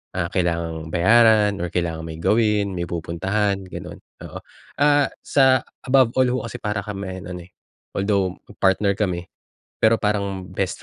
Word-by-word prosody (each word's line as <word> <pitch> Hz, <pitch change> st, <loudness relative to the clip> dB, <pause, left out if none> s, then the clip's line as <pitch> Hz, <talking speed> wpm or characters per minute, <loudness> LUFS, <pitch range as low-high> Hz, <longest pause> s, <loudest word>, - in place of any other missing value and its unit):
ah, 85 Hz, -1 st, -2 dB
kailangang 85 Hz, -3 st, -1 dB
bayaran 105 Hz, +2 st, +4 dB
or 90 Hz, -, -2 dB
kailangan 80 Hz, -2 st, -3 dB
may 80 Hz, -, -7 dB
gawin, 105 Hz, +1 st, +2 dB
may 85 Hz, -1 st, -3 dB
pupuntahan, 95 Hz, +5 st, -1 dB
gano'n, -, -, -8 dB, 0.2 s
oo. -, -, -8 dB, 0.4 s
Ah, 145 Hz, -1 st, +4 dB
sa 130 Hz, -2 st, +4 dB, 0.2 s
above 130 Hz, -2 st, +3 dB
all 130 Hz, -1 st, +4 dB
ho 125 Hz, -, 0 dB
kasi -, -, -9 dB
para 105 Hz, -2 st, -2 dB
kaming 95 Hz, -3 st, -6 dB
ano 90 Hz, -1 st, -7 dB
eh, -, -, -33 dB, 0.4 s
although 100 Hz, -2 st, 0 dB, 0.2 s
partner 100 Hz, +1 st, +3 dB
kami, 90 Hz, -4 st, -2 dB, 0.5 s
pero 110 Hz, 0 st, +4 dB
parang 100 Hz, -3 st, -2 dB
best 95 Hz, 0 st, -3 dB
100 Hz, 150 wpm, -22 LUFS, 90-110 Hz, 0.5 s, bayaran